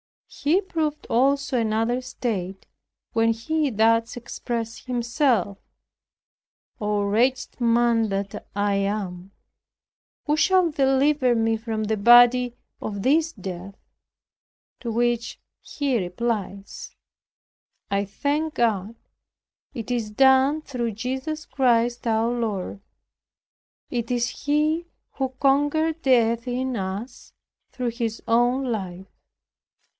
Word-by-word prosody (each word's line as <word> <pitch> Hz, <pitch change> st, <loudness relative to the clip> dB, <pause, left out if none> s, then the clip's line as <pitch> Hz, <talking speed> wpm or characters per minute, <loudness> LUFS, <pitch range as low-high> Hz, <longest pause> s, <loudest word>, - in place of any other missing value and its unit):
He 310 Hz, +7 st, +1 dB
proved 315 Hz, -5 st, -3 dB
also 270 Hz, +1 st, +2 dB
another 225 Hz, +3 st, 0 dB
state 195 Hz, -7 st, -4 dB, 0.5 s
when 230 Hz, 0 st, +2 dB
he 295 Hz, +6 st, -1 dB
thus 230 Hz, 0 st, +2 dB
expressed 235 Hz, -1 st, -5 dB
himself, 240 Hz, -, 0 dB, 1.2 s
"Oh, 210 Hz, -1 st, 0 dB
wretched 245 Hz, +8 st, 0 dB
man 235 Hz, -1 st, +3 dB
that 195 Hz, 0 st, -4 dB
I 205 Hz, 0 st, +1 dB
am! 195 Hz, -2 st, -3 dB, 0.9 s
who 300 Hz, 0 st, +1 dB
shall 365 Hz, 0 st, +3 dB
deliver 270 Hz, -2 st, +2 dB
me 225 Hz, 0 st, +2 dB
from 220 Hz, -1 st, -3 dB
the 215 Hz, 0 st, -1 dB
body 245 Hz, +3 st, +6 dB, 0.3 s
of 200 Hz, -2 st, -4 dB
this 320 Hz, +4 st, +3 dB
death?" 190 Hz, -1 st, -7 dB, 1.0 s
To 235 Hz, -, -5 dB
which 235 Hz, 0 st, -1 dB, 0.2 s
he 275 Hz, -5 st, -1 dB
replies, 200 Hz, +1 st, -4 dB, 1.0 s
"I 200 Hz, 0 st, +1 dB
thank 295 Hz, +9 st, -2 dB
God, 220 Hz, -2 st, 0 dB, 0.8 s
it 235 Hz, -3 st, -6 dB
is 235 Hz, -3 st, -1 dB
done 265 Hz, +6 st, +4 dB
through 240 Hz, -6 st, -3 dB
Jesus 265 Hz, +8 st, -4 dB
Christ 240 Hz, -2 st, +1 dB
our 225 Hz, +1 st, +2 dB
Lord." 215 Hz, -5 st, -3 dB, 1.1 s
It 235 Hz, -2 st, -2 dB
is 240 Hz, -1 st, 0 dB, 0.2 s
He 305 Hz, +3 st, +1 dB, 0.2 s
who 265 Hz, -1 st, -2 dB
conquers 290 Hz, +3 st, +2 dB
death 235 Hz, -3 st, +2 dB
in 255 Hz, +1 st, -2 dB
us 200 Hz, +6 st, -6 dB, 0.4 s
through 250 Hz, -2 st, -2 dB
His 230 Hz, -1 st, -4 dB
own 240 Hz, +3 st, +2 dB
life. 190 Hz, -4 st, -4 dB
235 Hz, 105 wpm, -24 LUFS, 215-265 Hz, 1.2 s, body